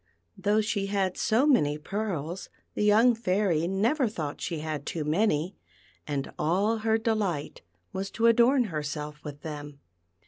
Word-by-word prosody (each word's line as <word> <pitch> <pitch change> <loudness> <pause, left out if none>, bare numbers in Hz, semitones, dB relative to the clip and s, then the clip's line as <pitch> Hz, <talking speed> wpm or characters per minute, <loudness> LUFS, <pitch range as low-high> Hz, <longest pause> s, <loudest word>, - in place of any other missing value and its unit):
Though 205 +2 +2
she 210 -2 -1
had 195 -2 0
so 230 +6 +2
many 150 - +3
pearls 180 -1 -4 0.2
the - - -1
young 220 +4 +5
Fairy 185 -6 +1
never 230 - +1
thought 155 -9 -5
she 165 - -2
had 155 -2 -4
too 155 +1 -3
many, 160 +1 +1 0.5
and 140 -2 -3
all 200 +8 +2
her 220 0 +2
delight 210 -9 -1 0.3
was 195 +1 -3
to 230 - 0
adorn 240 +3 +5
herself 150 0 -4
with 145 -1 -8
them. 145 -2 -7
195 Hz, 145 wpm, -28 LUFS, 150-220 Hz, 0.5 s, young